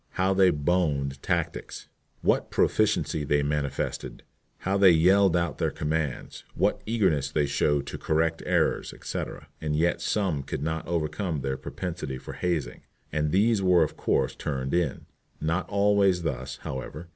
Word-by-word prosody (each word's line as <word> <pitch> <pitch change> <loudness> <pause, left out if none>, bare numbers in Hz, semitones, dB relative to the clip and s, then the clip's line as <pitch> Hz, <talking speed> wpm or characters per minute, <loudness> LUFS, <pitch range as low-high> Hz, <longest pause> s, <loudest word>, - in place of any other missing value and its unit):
How 95 +1 +2
they 95 -1 +5
"boned" 75 -4 0
tactics! - - -3 0.4
What - - +2
proficiency 75 - +1
they 75 0 +1
manifested! 70 -1 -3 0.3
How 95 +1 -1
they 100 -1 +7
yelled 90 +2 +5
out 85 -5 -1
their - - +1
commands! 75 -2 -3
What 100 +4 +1
eagerness 95 - +1
they 75 0 +1
showed 70 0 +1
to - - -6
correct 80 +1 0
errors, - - +1
etc. - - -6
And 75 -1 -1
yet 85 +3 +1
some 95 -9 0
could 70 +1 -5
not 80 +1 -3
overcome 80 -1 -2
their 65 0 -2
propensity 75 0 -5
for - - -9
hazing, 80 -8 -2 0.3
and 75 0 0
these 105 +3 +3
were 90 -3 +5
of 75 - -3
course 65 - 0
turned 70 -2 -3
in. 85 -6 0 0.3
Not 85 +4 -1
always 100 -3 +3
thus, 65 -5 -3
however. 75 +5 -6
80 Hz, 150 wpm, -27 LUFS, 70-90 Hz, 0.4 s, they